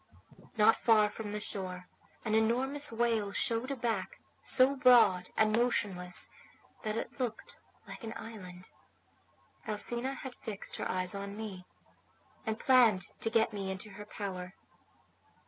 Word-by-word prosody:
"Not 215 +1 +6
far 215 -2 +4
from 215 -1 -6
the 210 +1 -3
shore 185 -3 -5 0.4
an 215 - 0
enormous 255 +6 +2
whale 225 -3 0
showed 230 +5 0
a 275 - -2
back 240 - -2 0.2
so 265 +1 +4
broad 240 -9 +5
and 215 0 +4
motionless 195 -7 +1 0.5
that 215 -1 -2
it 230 - -5
looked 240 -4 -4 0.3
like - - -9
an 225 -1 -5
island. 185 -5 -9 1.0
Alcina 240 +5 +1
had 265 -2 -7
fixed 215 -5 -5
her - - -3
eyes 185 0 0
on 200 +1 -6
me, 195 -5 -7 0.8
and 220 0 -1
planned 230 -8 +4
to 225 - 0
get 225 -1 +2
me 195 -2 -4
into 190 +2 -6
her 205 +2 -9
power. 190 -3 -6
220 Hz, 140 wpm, -32 LUFS, 195-235 Hz, 1.0 s, Not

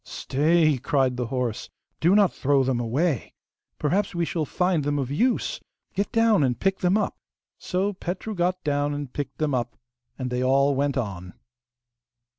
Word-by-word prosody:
'Stay!' 155 0 +2
cried 135 -2 +1
the 125 -1 -2
horse, 125 -3 -3 0.3
'do 175 +5 +4
not 205 -3 +4
throw 140 0 +2
them 130 -2 0
away! 130 - -1 0.4
Perhaps 190 +6 0
we 170 0 +1
shall 160 -1 -2
find 180 +1 0
them 145 +1 0
of 135 -2 -2
use. 250 - 0 0.3
Get 200 - -1
down 225 -4 +4
and 125 -3 +1
pick 195 0 +1
them 180 +3 +3
up.' 215 - -2 0.4
So 195 +2 -1
Petru 185 +4 -5
got 180 0 -1
down 145 0 0
and 145 -3 -6
picked 145 - -5
them 155 -2 0
up, 120 -2 -2 0.4
and 130 -2 -4
they 125 0 -1
all 140 +2 +3
went 140 0 0
on. 95 -7 -4
145 Hz, 170 wpm, -25 LUFS, 130-180 Hz, 0.4 s, do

